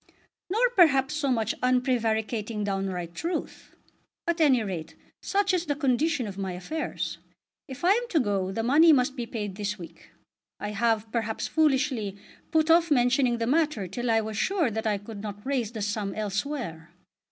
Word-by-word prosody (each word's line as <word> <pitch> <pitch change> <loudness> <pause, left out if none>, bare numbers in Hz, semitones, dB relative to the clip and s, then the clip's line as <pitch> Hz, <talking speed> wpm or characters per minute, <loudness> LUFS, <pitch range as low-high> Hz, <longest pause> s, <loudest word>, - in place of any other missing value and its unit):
"Nor 450 +7 +3
perhaps 280 - +4
so 300 -2 -1
much 225 -3 +1
unprevaricating 230 -4 0
downright 190 -4 -3
truth. 335 - -5 0.5
At 340 0 0
any 265 -7 +4
rate 165 -5 -5 0.3
such 400 -1 +1
is 355 -1 0
the 290 - 0
condition 275 0 +1
of 200 -2 -7
my 190 -2 -3
affairs. 190 - -4 0.5
If 275 +5 -6
I 365 - +6
am 475 +4 +2
to 325 - +2
go 200 -6 0
the 225 +3 -2
money 310 +7 +6
must 265 0 +2
be 240 -3 -4
paid 205 -5 -5
this 210 0 -2
week. 170 - -12 0.5
I 205 - -4
have, 220 +1 0
perhaps 225 -2 -2
foolishly, 265 -9 +1 0.3
put 320 0 +3
off 335 0 +5
mentioning 250 -2 +3
the 230 - -1
matter 290 - +1
till 240 +7 -3
I 225 -1 +3
was 215 -1 -5
sure 345 - +1
that 220 +1 -2
I 210 -1 +1
could 205 +1 -9
not 205 0 -7
raise 255 -5 -1
the 220 -3 -4
sum 205 -1 -2
elsewhere. 210 - -3
235 Hz, 175 wpm, -27 LUFS, 205-290 Hz, 0.5 s, I